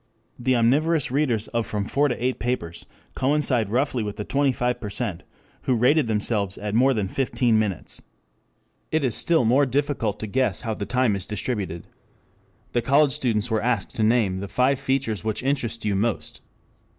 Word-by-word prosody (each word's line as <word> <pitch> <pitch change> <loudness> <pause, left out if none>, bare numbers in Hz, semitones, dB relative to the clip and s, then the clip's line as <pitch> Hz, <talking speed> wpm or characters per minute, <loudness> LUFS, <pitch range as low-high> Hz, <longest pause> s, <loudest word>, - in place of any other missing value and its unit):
The 130 +1 +2
omnivorous 140 +5 +2
readers 130 -6 +1
of 115 -1 -1
from 105 -2 -2
four 145 +6 +2
to 125 - -2
eight 125 +2 -1
papers 115 -9 -3 0.3
coincide 130 -5 +1
roughly 125 +2 0
with 105 -1 -4
the 105 - -4
twenty 140 0 +2
five 125 -1 -1
percent 105 -3 -4 0.4
who 130 - +2
rated 125 +4 +3
themselves 105 -2 -1
at 105 0 -4
more 130 +4 +4
than 105 -3 -1
fifteen 120 0 +1
minutes. 100 -6 -3
2 - - -22 0.9
It 155 - -1
is 125 -4 +1
still 165 -1 +2
more 135 +5 +4
difficult 130 -6 -1
to - - -2
guess 130 +5 0
how 115 -2 -2
the 105 -1 -5
time 125 -4 +2
is 95 - -4
distributed. 100 -5 -3 0.9
The 120 - +2
college 140 +4 +4
students 115 -3 -1
were 110 - +1
asked 115 -4 -1
to - - -2
name 110 -4 +2
"the 100 - -5
five 130 +5 +1
features 130 -6 -1
which 110 +2 -2
interest 120 -5 -1
you 105 -2 +1
most." 110 +2 -2
120 Hz, 180 wpm, -24 LUFS, 105-130 Hz, 0.9 s, more